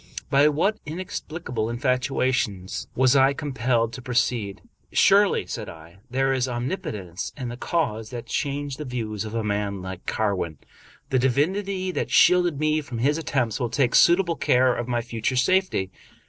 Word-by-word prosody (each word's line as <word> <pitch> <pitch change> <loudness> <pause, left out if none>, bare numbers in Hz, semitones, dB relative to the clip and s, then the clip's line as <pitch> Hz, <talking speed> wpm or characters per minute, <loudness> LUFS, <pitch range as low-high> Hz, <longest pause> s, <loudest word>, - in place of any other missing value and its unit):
By 140 +1 +5
what 185 +9 +1
inexplicable 155 -7 -4
infatuation 125 -5 0 0.3
was 130 +1 +4
I 135 0 +5
compelled 120 -5 -1
to 130 - -7
pro 125 -1 -5
ceed? 115 -5 0 0.2
" - - -41
Surely," 200 +1 +4
said - - -6
I, 85 +3 -13
" 130 - -37
there 135 +1 +1
is 130 -1 0
omnipotence 110 - -4
in 125 -3 -4
the 120 - -6
cause 120 -6 -2
that 120 -1 -6
changed 140 +1 -3
the - - -3
views 110 -5 -4
of 110 +1 -6
a 115 - -1
man 100 -2 -2
like 95 -1 -8
Carwin. 95 -8 -1 0.5
The 130 - +3
divinity 185 +9 0
that - - -2
shielded 175 -5 +4
me 155 0 +1
from 125 -5 -7
his 145 +7 +1
attempts 130 -8 -1
will 120 -2 -1
take 125 +1 +1
suitable 170 0 +5
care 125 0 +3
of 120 - -4
my 120 -1 0
future 115 +1 -2
safety. 155 - +1
130 Hz, 170 wpm, -24 LUFS, 115-150 Hz, 0.5 s, By